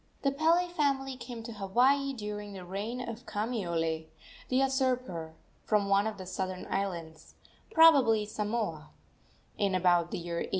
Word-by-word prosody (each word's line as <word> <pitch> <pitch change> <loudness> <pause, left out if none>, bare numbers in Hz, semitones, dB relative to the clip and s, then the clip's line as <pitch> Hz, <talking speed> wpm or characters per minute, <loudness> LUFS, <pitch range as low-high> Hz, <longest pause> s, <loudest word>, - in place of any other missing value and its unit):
The 275 - +3
Pele 325 +5 +3
family 275 -5 0
came 240 -2 -8
to 230 0 -7
Hawaii 250 +8 +2
during 210 -3 -6
the 185 -2 -8
reign 220 +7 -4
of 230 +1 -7
Kamiole, 170 -8 -2 0.4
the 255 - 0
usurper, 255 - 0 0.3
from 205 -2 +1
one 200 +2 +3
of 220 - -4
the 190 - -7
southern 185 0 -4
islands 170 -5 -4 0.4
probably 275 - +6
Samoa 210 -7 -3 0.7
in 200 -2 +2
about 175 -2 +3
the - - -3
year 170 0 -4
A. - - -4
210 Hz, 145 wpm, -30 LUFS, 185-255 Hz, 0.7 s, probably